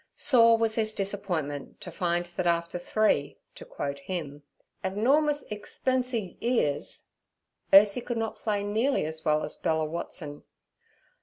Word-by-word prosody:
Sore 230 -4 +5
was 225 -1 +1
his 215 -1 0
disappointment 180 -8 -3
to - - -8
find 175 -2 -1
that 175 +1 -3
after 170 +1 0
three—to 175 -6 -1
quote 140 0 -4
him—'abnormous 190 - -1
egspensie 240 -1 -2
'ears' 230 - 0 0.7
Ursie 205 +4 +7
could 240 -2 -3
not 225 -1 -2
play 205 -2 -1
nearly 220 - +1
as 160 0 -5
well 155 -1 +2
as - - -5
Bella 160 -1 0
Watson. 155 -2 -5
195 Hz, 125 wpm, -28 LUFS, 160-225 Hz, 0.7 s, Ursie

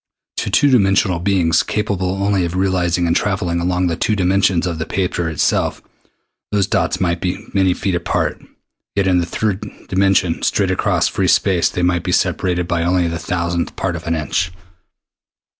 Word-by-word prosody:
To - - -2
two 145 - +3
dimensional 95 -5 +3
beings 85 -3 +2
capable 95 -2 -2
only 100 -2 +1
of 85 +1 -3
realizing 90 -2 +1
and 85 - +1
traveling 95 -4 0
along 90 +1 0
the 85 -2 0
two 110 - 0
dimensions 95 -1 +2
of 85 -3 -3
the 80 - -2
paper 90 -3 -1
itself 80 - 0 0.7
those 100 -2 +2
dots - - 0
might 85 -2 0
be 90 0 -3
many 95 -2 +2
feet 95 - -2
apart, 85 -1 -1 0.5
yet 100 -1 +1
in 90 -1 +3
the 85 - -2
third 105 0 -2 0.3
dimension 95 -3 +2
straight - - +1
across - - +1
free - - -1
space 95 -4 +3
they 90 - -3
might 90 -1 +2
be - - -3
separated 90 -1 0
by 85 -1 0
only 90 0 +1
the 85 0 -3
thousandth 85 -1 -2
part 90 -3 -2
of 85 0 -8
an 85 - +1
inch. 80 +3 -1
90 Hz, 175 wpm, -18 LUFS, 85-95 Hz, 0.7 s, two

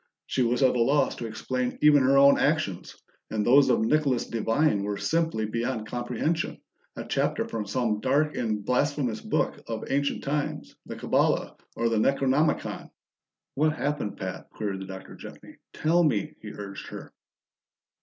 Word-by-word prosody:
She 130 - -1
was 120 +2 +2
at 130 - +4
a 120 - +2
loss 140 +3 +2
to 115 - -4
explain 125 +3 -3
even 150 -2 +7
her 135 +1 +4
own 140 0 +6
actions, 145 - -1 0.3
and 105 -1 -1
those 135 +2 +6
of 120 - +3
Nicholas 135 +1 +1
Devine 115 +1 +1
were 100 0 -2
simply 160 -8 0
beyond 115 +1 -2
comprehension, 125 +8 -2 0.4
a - - -6
chapter - - 0
from 110 -2 -4
some 115 -2 0
dark 145 +6 +1
and 110 -4 -2
blasphemous 125 -3 0
book - - -1
of 115 -1 -4
ancient 140 +1 0
times 145 +1 -3
the - - -6
Kabbala - - +1 0.2
or 115 - 0
the 115 -1 +1
Necronomicon. 135 +5 +1 0.6
"What 155 +2 +2
happened, 145 -9 -3
Pat?" 95 -1 -6
queried 100 -3 -4
the 95 - -7
Doctor 95 0 -9
gently. - - -12
"Tell 170 +3 +2
me," 115 - 0
he 105 - -8
urged 100 -2 -8
her. - - -9
125 Hz, 160 wpm, -27 LUFS, 110-145 Hz, 0.6 s, even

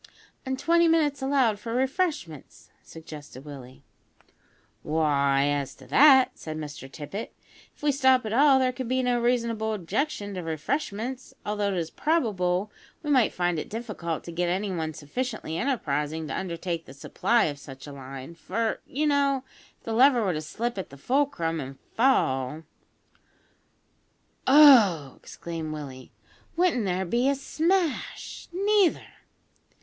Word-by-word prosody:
"An' 265 0 -1
twenty 340 +4 +3
minutes 300 -4 +2
allowed 265 -6 +2
for 230 +3 -5
refreshments," 265 - -2
suggested 150 -4 -11
Willie. 135 -1 -11 1.0
"Why, 140 -3 +2
as 145 -2 -1
to - - -15
that," 270 -3 +6
said 155 -1 -6
Mr 145 -3 -8
Tippet, 175 +11 -7 0.4
"if - - -24
we 295 - +4
stop 260 -3 +3
at 215 - -3
all, 275 +2 +6
there 260 -1 +2
could 255 0 -5
be 255 +1 0
no 245 -1 +1
reasonable 230 -2 0
objection 210 - -2
to 185 - -4
refreshments, 230 - -3
although 210 -1 -1
it 195 -2 -1
is 165 -2 -3
probable 205 - 0 0.3
we 295 - -1
might 255 -6 +4
find 175 -2 0
it - - -6
difficult 210 -8 -4
to 170 - -8
get 175 +1 -1
anyone 175 -4 -2
sufficiently 215 - -4
enterprising 160 - -1
to 135 - -4
undertake 170 -2 -4
the 135 - -12
supply 230 - +1
of 145 -2 -2
such 135 -2 -11
a 145 - -9
line; 135 +2 -9
for, 220 +7 -2
you 295 +4 -1
know, 280 -2 +2 0.3
if - - -38
the 225 - -4
lever 250 0 +5
were 190 -3 +1
to 155 - -3
slip 225 +8 -4
at 185 - -6
the 140 - -13
fulcrum 170 - 0
and 135 -1 -7 0.2
fall 155 - +1 1.3
" - - -29
"Oh!" 230 - +7
exclaimed 165 -2 -7
Willie, 135 -4 -8 0.4
"wouldn't 330 - +2
there 185 0 -1
be 240 +8 +1
a 280 - +2
smash; 325 +4 -1
neither!" 395 0 +2
210 Hz, 150 wpm, -26 LUFS, 155-265 Hz, 1.3 s, Oh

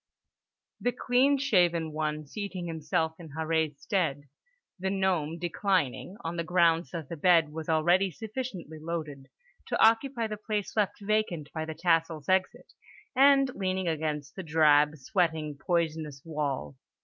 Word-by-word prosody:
the 245 - +1
clean 255 +3 +2
shaven 175 - +2
one 155 0 -2
seating 195 +2 -5
himself 160 -1 -1
in 165 -2 -10
Harree's 160 -2 0
stead, 160 -8 -1 0.6
the 190 +1 -1
gnome 185 -5 0
declining 180 0 -1
(on 165 +1 -4
the 170 - -1
grounds 165 -2 +3
that 165 -2 -6
the 170 - -6
bed 165 -1 +4
was 160 +1 -6
already 175 +5 +3
sufficiently 210 - -6
loaded) 155 -4 -5 0.4
to - - -1
occupy 230 +2 +3
the 215 -1 -4
place 210 -1 -3
left 210 -2 0
vacant 200 -8 -1
by 160 -2 -3
the 160 0 -6
tassel's 165 -3 +1
exit, 185 0 0 0.4
and 275 0 +5
leaning 185 -3 -2
against 150 -3 -2
the 190 - -5
drab, 150 -2 +4
sweating, 155 0 -1
poisonous 160 -3 -1
wall. 140 - -3
165 Hz, 140 wpm, -29 LUFS, 155-190 Hz, 0.6 s, and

